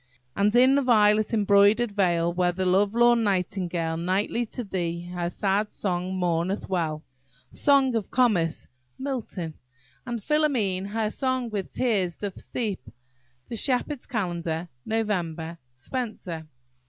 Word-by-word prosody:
"And 205 +3 +2
in 255 +2 +6
the 280 - +4
violet 215 -4 +4
embroider'd 205 +1 +4
vale, 175 -4 +1
Where 175 0 +2
the 185 +1 -2
love 200 +4 +2
lorn 240 0 +5
nightingale 180 -4 -1
Nightly 195 +7 0
to 245 - -6
thee 175 -4 -3
her 175 -1 -2
sad 200 +3 0
song 185 -1 -2
mourneth 180 +2 -1
well." 160 -4 -1 0.5
Song 275 -3 +3
of 225 -4 -2
Comus–MILTON. 180 - -1 0.5
"And 240 -1 -2
Philomele 240 -11 +1
her 215 +1 -1
song 255 -2 -1
with 200 -3 -3
teares 195 -9 0
doth 200 -2 -5
steepe." 210 - -4 0.6
The 235 - -5
Shepherd's 260 +3 -1
Calendar, 175 -5 -2 0.2
Nov. 170 -7 -2 0.2
SPENSER. 180 - -5
200 Hz, 125 wpm, -26 LUFS, 175-235 Hz, 0.6 s, in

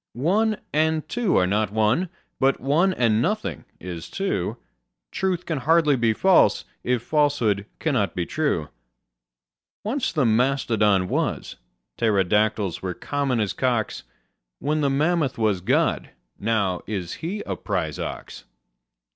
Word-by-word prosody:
One 205 - +1 0.2
and 155 +1 +1
two 235 -5 +1
are 90 - +4
not 105 +3 0
one: 110 - +1 0.3
but 135 +1 +2
one 155 +9 +2
and 115 -9 +2
nothing 210 - -2
is 85 -2 -7
two: 115 - -2 0.5
Truth 185 -2 -1
can 160 -4 -2
hardly 155 +1 +3
be 115 -3 +2
false, 190 - +4 0.2
if 125 -1 0
falsehood 130 -10 +1
cannot 130 - 0
be 90 - -1
true. 140 - -1 1.1
Once 245 +5 -1
the 150 -5 +1
mastodon 110 -5 +2
was: - - -2 0.4
pterodactyls 105 -2 +1
were 90 -2 -3
common 140 -4 -1
as 105 -3 0
cocks: 120 -4 -1 0.6
Then 155 +1 0
the 140 - +2
mammoth 150 -1 +1
was 105 -5 +1
God: 90 - +1 0.3
now 100 -4 0
is 95 -5 -3
He 190 +6 -3
a 95 - -3
prize - - -3
ox. - - -6
125 Hz, 130 wpm, -24 LUFS, 105-155 Hz, 1.1 s, are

